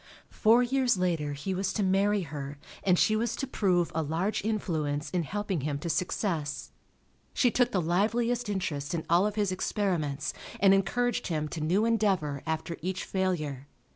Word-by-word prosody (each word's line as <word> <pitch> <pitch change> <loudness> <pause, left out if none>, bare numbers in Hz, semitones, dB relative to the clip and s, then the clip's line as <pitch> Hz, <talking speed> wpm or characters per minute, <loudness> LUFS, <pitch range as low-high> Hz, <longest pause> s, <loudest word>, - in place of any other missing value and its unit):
Four 230 +3 +4
years 250 -3 +2
later 165 -5 0
he 150 +7 -3
was 190 0 -1
to 210 - 0
marry 200 +2 +2
her 145 -2 -6 0.3
and 185 -2 +4
she 215 - +3
was 225 +1 0
to 270 - -3
prove 185 -9 +1
a 160 - 0
large 165 +8 -1
influence 155 -9 -1
in 180 - +1
helping 195 0 -2
him 145 +1 -2
to 165 +3 -3
success. 160 -2 -2 0.6
She 245 - +3
took 245 +1 +2
the 190 - +1
liveliest 230 +7 +1
interest 160 -6 -2
in 160 - -3
all 180 +4 +5
of 210 - -4
his 205 -3 +1
experiments 165 -8 -1 0.3
and 195 -1 +6
encouraged 235 +5 +1
him 155 -3 -1
to 160 - -5
new 185 +8 +2
endeavor 195 -11 +1
after 160 +1 -2
each 185 +3 -3
failure. 155 -8 -2
185 Hz, 170 wpm, -29 LUFS, 155-210 Hz, 0.6 s, and